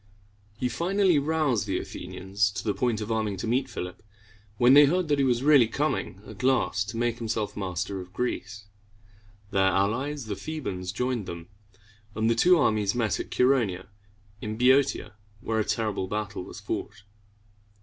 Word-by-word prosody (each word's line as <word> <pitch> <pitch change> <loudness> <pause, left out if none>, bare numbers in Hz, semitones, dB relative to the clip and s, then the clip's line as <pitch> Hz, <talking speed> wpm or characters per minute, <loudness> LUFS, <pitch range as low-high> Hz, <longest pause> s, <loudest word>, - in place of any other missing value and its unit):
He 125 - 0
finally 175 - +2
roused 140 -8 0
the 95 - 0
Athenians 100 +2 -2
to 105 - -5
the 105 - 0
point 120 -3 -1
of 105 +2 -4
arming 110 -3 -1
to 90 - -4
meet 130 +4 0
Philip, 90 0 -6 0.6
when 120 +3 +6
they 145 +1 +9
heard 175 +3 0
that 145 -1 +2
he - - +3
was 125 -1 +1
really 140 -5 +6
coming 115 -6 -2
at 105 -3 -10
last 125 -5 +1
to 115 - -5
make 120 0 -1
himself 110 -2 -2
master 95 0 -3
of 90 0 -12
Greece. 105 -1 -4 0.9
Their 95 -1 +3
allies, 120 +9 0
the 105 -2 -4
Thebans, 95 -12 -5
joined 125 0 -2
them; 85 0 -8 0.7
and 110 +1 +1
the - - +5
two 175 +10 +5
armies 110 -8 +2
met 115 -3 0
at - - -5
Chær 125 +2 +4
o 130 - +2
ne´a, 95 0 -8 0.5
in 110 0 -4
Boeotia, 130 +1 +3 0.3
where 110 +1 -1
a - - +2
terrible 105 -4 -1
battle 105 -2 -4
was - - -9
fought. 95 - -5
110 Hz, 175 wpm, -27 LUFS, 100-130 Hz, 0.9 s, they